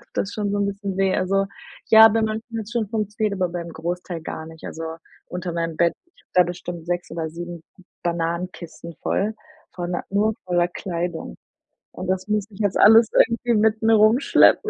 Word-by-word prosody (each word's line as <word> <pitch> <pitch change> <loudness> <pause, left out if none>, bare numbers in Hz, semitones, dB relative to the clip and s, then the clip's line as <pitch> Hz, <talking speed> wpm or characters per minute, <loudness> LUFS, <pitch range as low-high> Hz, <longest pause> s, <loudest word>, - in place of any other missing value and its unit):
tut - - -24
das 200 - -1
schon 205 -2 -2
so 205 - 0
'n 200 - +1
bisschen 200 -1 -4
weh. 190 -1 +2
Also, 195 +1 +1 0.4
ja, 220 0 +10
bei 225 +1 +1
manchen 220 +1 -3
hats 220 +1 -6
schon 225 -4 -1
funktioniert, 210 -1 -1
aber 180 - +2
beim 170 -1 -5
Großteil 170 +1 -4
gar 160 0 -6
nicht. 160 0 -13
Also, 165 - -6 0.5
unter 180 -1 -4
meinem 165 -1 -2
Bett, 170 0 +3
sind 345 - -29
da 180 - +7
bestimmt 175 -1 -6
6 175 -1 -3
oder 165 -1 -3
7 175 0 -7 0.4
Bananenkisten 170 0 -4
voll 215 +3 0 0.4
voller 175 0 -3
nur 210 +2 +2
voller 175 -1 +2
Kleidung 170 - -4 0.6
und 185 - -7
das 185 +1 -1
muss 210 -2 0
ich 195 - -14
jetzt 205 -3 +1
alles 225 +2 +8
irgendwie 240 0 +3
mit 220 +1 +2
mir 225 0 +5
rumschleppen. 230 - +5
185 Hz, 185 wpm, -23 LUFS, 175-215 Hz, 0.6 s, ja